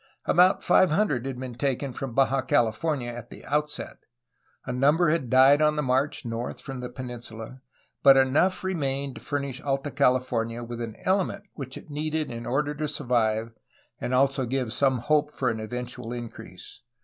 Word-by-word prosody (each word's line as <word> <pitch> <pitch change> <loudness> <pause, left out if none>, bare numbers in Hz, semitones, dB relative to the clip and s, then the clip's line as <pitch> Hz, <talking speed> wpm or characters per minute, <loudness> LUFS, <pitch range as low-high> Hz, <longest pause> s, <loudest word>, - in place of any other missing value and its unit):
About 180 +2 +4
five 185 - +5
hundred 150 - +1
had 130 -2 -5
been 130 -1 -5
taken 135 +1 -2
from 125 -2 -5
Baja 135 0 +3
California 120 +3 0
at 120 -1 -9
the - - -12
outset. 150 +1 -2 0.7
A 125 - -3
number 150 +6 +3
had 155 -7 -1
died 135 +4 +6
on 150 0 +3
the 150 - 0
march 130 +2 0
north 115 +1 -4
from 135 -2 -7
the 125 0 -5
peninsula, 120 -1 -8 0.4
but 135 -1 +8
enough 145 +9 +3
remained 140 -7 -2
to - - -10
furnish 140 -3 -3
Alta 140 +1 -2
California 125 -4 +1
with 120 0 -6
an 115 -2 -5
element 195 +1 +1
which 135 -3 -7
it - - -12
needed 155 0 -2
in 115 0 -6
order 145 +3 0
to 150 +1 -3
survive 115 -5 0 0.5
and - - -3
also 135 +1 +3
to 125 - -3
give 125 -3 -1
some 130 0 +2
hope 150 +4 +1
for 130 -4 -1
an 110 - -4
eventual 125 +1 -6
increase. 120 -2 -9
130 Hz, 175 wpm, -26 LUFS, 120-145 Hz, 0.7 s, but